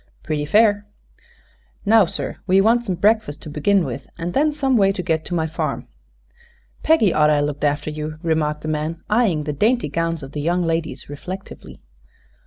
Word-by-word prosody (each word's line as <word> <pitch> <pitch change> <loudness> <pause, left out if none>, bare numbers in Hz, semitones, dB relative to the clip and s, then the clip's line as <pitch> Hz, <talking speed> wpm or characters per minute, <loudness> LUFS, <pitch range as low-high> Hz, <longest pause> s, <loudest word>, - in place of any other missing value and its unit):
"Pretty 150 -1 -2
fair." 205 +4 +3 1.0
"Now, 220 -1 +6
sir, - - -4
we 190 +1 +4
want 230 +4 +3
some 190 -6 -2
breakfast, 210 -6 +1
to 155 - -8
begin 180 +5 +2
with, 135 - -6
and 170 +1 -4
then 300 +2 +2
some 275 -3 0
way 195 -3 +4
to 190 -2 -4
get 160 -2 0
to 175 - -3
my 160 -2 0
farm." 160 0 -3 0.9
"Peggy 270 - +3
orter 150 0 +4
'a' 145 - +2
looked 145 0 -3
after 145 +1 0
you," 155 0 -5
remarked 155 -2 0
the - - -4
man, 155 +2 -3
eyeing 210 -9 +2
the 150 0 -3
dainty 220 - +1
gowns 165 +1 -2
of 135 - -9
the 150 - -4
young 175 +3 +1
ladies 165 -5 -2
reflectively. 180 +7 -9
165 Hz, 185 wpm, -21 LUFS, 150-205 Hz, 1.0 s, Now